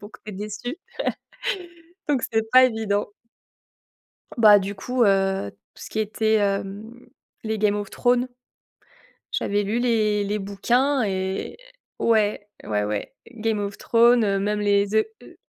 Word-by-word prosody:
donc 205 +1 -11
tu 215 - -7
es - - -9
déçu, 210 - -5 1.3
donc 275 -5 +1
c'est 220 0 0
pas 255 0 +8
évident. 220 -4 0 1.3
Bah, 210 -3 +8
du 200 +1 -4
coup, 245 +5 0
heu, 195 - +1 0.2
tout - - -14
ce - - -9
qui 220 - -3
était, 220 +1 +1
hem, 200 +2 -1 0.5
les 220 0 -2
Game 210 -1 +2
of 205 -1 -4
Thrones, 245 0 +1 1.0
j'avais 205 0 0
lu 220 +4 -1
les 215 -4 +1
les 205 +1 -2
bouquins 245 +8 +1
et 190 -1 -3 0.4
ouais, 210 -2 +1 0.2
ouais, 105 -1 -1
ouais, 105 -1 -4 0.2
Game 220 -2 -2
of 200 -1 -4
Thrones, 235 0 +4
heu, 195 -1 +1
même 210 +1 -1
les, 200 0 +3
The 220 +2 +2 0.2
heu - - -15
210 Hz, 145 wpm, -23 LUFS, 200-225 Hz, 1.3 s, pas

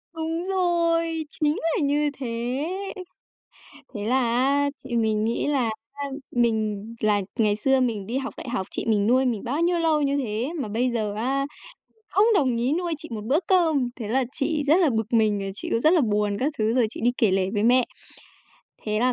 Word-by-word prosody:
Đúng 325 +1 -2
rồi, 335 -3 +1
chính 300 0 0 0.2
là - - 0
như 290 +1 +2
thế! 270 - -5 1.7
Thế 205 -1 -4
là 255 +4 +2
á 265 +4 +2
thì 240 - -4
mình 220 -2 +1
nghĩ 230 +5 -1
là 270 -6 +1 0.2
á 285 0 -5 0.3
mình 220 -4 0
là 210 -1 +2 0.2
ngày 210 -2 +3
xưa 265 +5 +2
mình 220 -6 -1
đi 245 +4 -2
học 270 0 -4
đại 255 - -7
học 190 -6 -2
chị - - -4
mình 210 -2 +2
nuôi 255 +3 +4
mình 230 -5 -1
bao 280 +7 -1
nhiêu 345 0 +2
lâu 320 -2 +2
như 280 0 +1
thế, 240 +2 -2
mà 260 - -2
bây 240 +4 0
giờ 215 -3 -1
á 270 +5 0 0.5
mình 445 - -36
không 400 +3 +4
đồng 260 - +2
ý 245 +5 +1
nuôi 345 -1 -1
chị 320 - -11
một 215 -2 -4
bữa 290 +5 +3
cơm, 320 -9 +3
thế 225 -4 -6
là 260 +4 +2
chị 300 +1 -1
rất 305 - +6
là 335 - +4
bực 225 0 -2
mình, 215 -3 +3
rồi 195 0 -4
chị - - -6
cũng 230 - +2
rất 315 +7 +4
là 335 - +4
buồn 210 -3 0
các 290 +3 0
thứ 220 +1 +1
rồi 245 -3 +3
chị - - -9
đi 245 - +4
kể 215 -5 +3
lể 190 0 +1
với 205 - 0
mẹ. 245 +2 +4 1.0
Thế 215 0 -1
là 250 +1 +3
250 Hz, 215 wpm, -24 LUFS, 220-295 Hz, 1.7 s, rất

